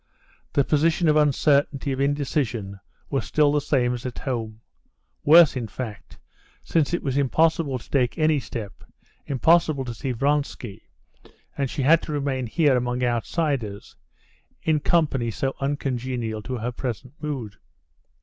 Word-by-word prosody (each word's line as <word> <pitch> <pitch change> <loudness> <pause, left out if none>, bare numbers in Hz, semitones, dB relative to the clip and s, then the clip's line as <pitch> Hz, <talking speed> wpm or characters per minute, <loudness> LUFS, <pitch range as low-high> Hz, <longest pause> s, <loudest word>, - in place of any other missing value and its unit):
The 140 - +3
position 160 +4 +2
of 150 - +4
uncertainty, 145 -1 +2
of 135 0 -2
indecision, 135 -8 -1 0.3
was 135 - 0
still 150 -1 +2
the 145 0 +1
same 125 -4 +1
as 120 0 -5
at 125 -2 -6
home—worse, 130 +6 +1
in 120 -3 -3
fact, 110 -3 -8 0.5
since 160 -2 +1
it 175 - -1
was 135 -1 0
impossible 150 0 +2
to 115 - -14
take 125 -4 0
any 155 -1 +3
step, 110 -6 -7 0.4
impossible 150 0 +3
to 120 - -5
see 130 +3 -4
Vronsky, 140 -4 -2 0.7
and 140 -2 -1
she 135 - -3
had 160 +5 +5
to 155 - -6
remain 135 -3 -1
here 145 +3 +3
among 125 0 -1
outsiders, 120 - -2 0.7
in 155 -1 +2
company 145 -7 +1
so 135 +4 -2
uncongenial 125 -5 -2
to 125 +4 -4
her 120 +2 -3
present 125 +1 -5
mood. 130 -10 -5
135 Hz, 140 wpm, -24 LUFS, 120-150 Hz, 0.7 s, had